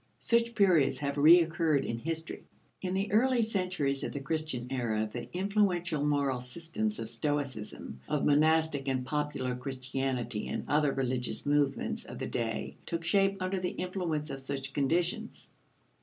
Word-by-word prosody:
Such 235 0 +1
periods 170 -11 +4
have 140 +1 -2
recurred 160 -1 +5
in 115 - -3
history. 165 +4 -4 0.4
In 185 0 -2
the 195 +2 -1
early 240 +2 +4
centuries 180 -10 0
of - - -2
the 140 - -3
Christian 155 -3 -2
era, 110 -4 0
the - - -5
influential 180 -5 +1
moral 140 -3 +1
systems 170 - -2
of 110 - -4
Stoicism, 130 - -3
of 150 - +1
monastic 155 -1 +3
and 130 -1 0
popular 145 -3 -1
Christianity 130 -3 -3
and - - -4
other 150 -1 +3
religious 130 -2 -2
movements 145 -1 +1
of - - -8
the - - -3
day, 70 +1 -3
took 170 -1 -2
shape 195 +3 +2
under 185 +1 -1
the 180 0 -1
influence 175 -5 -2
of 135 - -5
such 135 0 -5
conditions. 175 - -1
150 Hz, 150 wpm, -31 LUFS, 135-180 Hz, 0.4 s, recurred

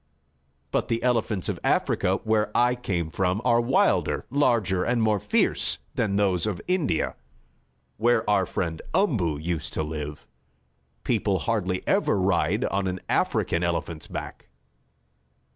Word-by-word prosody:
But - - 0
the 115 0 -1
elephants 115 -6 0
of - - -2
Africa, - - +1
where 110 -1 +1
I 120 +1 +4
came 90 -10 -3
from, 95 +2 0
are 120 0 +4
wilder, 120 +3 +2
larger 115 -10 +2
and 120 +3 +1
more 110 -2 +2
fierce - - +1 0.2
than 100 -3 0
those 100 -2 +1
of 100 -4 -2
India, 180 - 0 0.8
where 120 +3 +2
our 100 -3 +2
friend 80 -3 -3
Umboo 115 - +1
used 80 +1 -3
to - - -1
live. 75 -1 -6 0.8
People 105 -5 +1
hardly 95 -2 -2
ever 100 - +2
ride 95 +3 +1
on 100 -1 -1
an 90 0 -3
African 85 - +1
elephant's 85 -2 -2
back." - - -7
100 Hz, 135 wpm, -25 LUFS, 85-115 Hz, 0.8 s, I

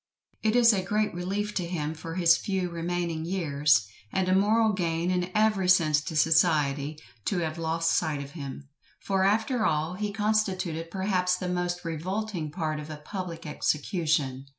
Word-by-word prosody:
It 220 +1 +1
is 235 -2 +6
a 195 - +1
great 210 +3 0
relief 200 +4 -3
to 180 -3 -2
him 155 -3 -3
for 165 +1 -7
his 170 -2 +5
few 185 -1 -2
remaining 170 -1 -2
years, 150 - +2 0.2
and 190 -1 0
a 185 - +3
moral 215 +3 +3
gain 170 -1 -1
in 180 0 0
every 210 -4 +2
sense 155 -5 +4
to 160 - -5
society, 155 -2 +2 0.3
to 195 - 0
have 160 0 -3
lost 165 0 0
sight 155 -4 0
of 140 - -11
him; 140 -3 -8 0.3
for 195 -1 0
after 220 +4 +2
all, 160 -2 +1
he 205 +2 -3
constituted 195 -6 -1
perhaps 185 -1 +1
the 180 - -4
most 175 0 -2
revolting 175 +1 -3
part 155 -1 -3
of 150 +1 -8
a 155 - -6
public 170 +1 -6
execution. 150 -3 -1
175 Hz, 170 wpm, -27 LUFS, 155-190 Hz, 0.3 s, is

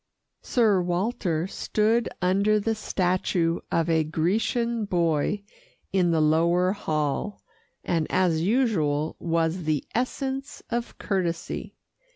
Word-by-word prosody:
Sir 215 -6 +3
Walter 175 -2 -1
stood 215 +4 0
under 200 +4 +3
the 225 +2 0
statue 180 -4 0
of 165 -1 +1
a 160 -1 +3
Grecian 215 +8 0
boy 170 +1 0 0.5
in 180 -3 +3
the 165 -1 +2
lower 170 +4 +3
hall, 155 0 -2 0.4
and 165 -3 0
as 170 -4 +2
usual 170 - +1
was 165 +1 0
the 150 -3 0
essence 265 +3 -3
of 235 0 -3
courtesy. 175 -5 -3
180 Hz, 110 wpm, -26 LUFS, 165-215 Hz, 0.5 s, Sir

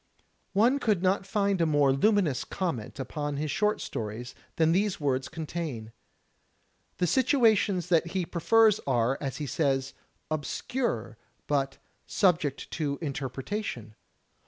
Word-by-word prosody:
One 235 +8 +4
could 210 -8 +1
not 190 +1 +1
find 200 -2 +1
a 165 - +3
more 145 -3 +4
luminous 180 - +2
comment 145 - -4
upon 145 +2 -3
his 150 0 -2
short 210 +5 +1
stories 115 +3 -5 0.2
than 160 0 +3
these 200 +2 +1
words 135 -3 0
contain. 155 -8 -5 1.1
The 180 - +1
situations 220 - +3
that 170 -1 +3
he 180 +1 -2
prefers 215 +6 +4
are, 125 0 +1
as 135 -3 -3
he 150 - -3
says, 135 -1 0 0.4
"obscure" 150 - -2 0.3
but 135 -2 0 0.3
"subject 165 -8 +1
to 145 -3 -2
interpretation." 135 - -4
160 Hz, 125 wpm, -28 LUFS, 135-195 Hz, 1.1 s, One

